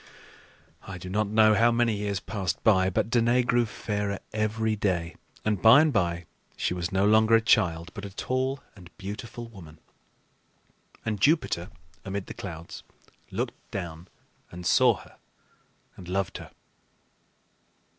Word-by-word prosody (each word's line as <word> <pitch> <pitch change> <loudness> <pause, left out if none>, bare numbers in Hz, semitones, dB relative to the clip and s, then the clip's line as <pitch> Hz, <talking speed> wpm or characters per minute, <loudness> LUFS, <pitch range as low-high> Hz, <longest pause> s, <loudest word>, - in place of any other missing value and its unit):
I 95 - -6
do 90 +1 -8
not 105 +1 +1
know 110 +1 +5
how 115 +2 +4
many 115 -2 +1
years 100 -2 -2
passed 95 -1 -3
by, 95 -4 +4
but 100 +4 -1
Danaë 120 +1 +3
grew 120 -1 +2
fairer 105 -2 -3 0.2
every 110 +1 0
day, 85 -5 -1 0.3
and 105 -3 0
by 115 +5 +8
and 155 -2 +2
by 85 -4 0 0.3
she - - 0
was 90 0 -3
no 95 +1 +2
longer 110 +2 +5
a - - +6
child, 90 -6 +2
but 100 - -8
a 100 - -5
tall 130 +6 -2
and 90 -4 -14
beautiful 110 +4 -7
woman; 85 -8 -13 1.3
and 105 -3 -2
Jupiter 140 - +2 0.3
amid 95 0 -4
the - - -8
clouds 85 -3 -8 0.5
looked - - -4
down 85 -2 -6 0.4
and 90 0 -9
saw - - +5
her - - -16 0.8
and 90 - -11
loved 95 0 -2
her. - - -10
100 Hz, 145 wpm, -27 LUFS, 90-110 Hz, 1.3 s, by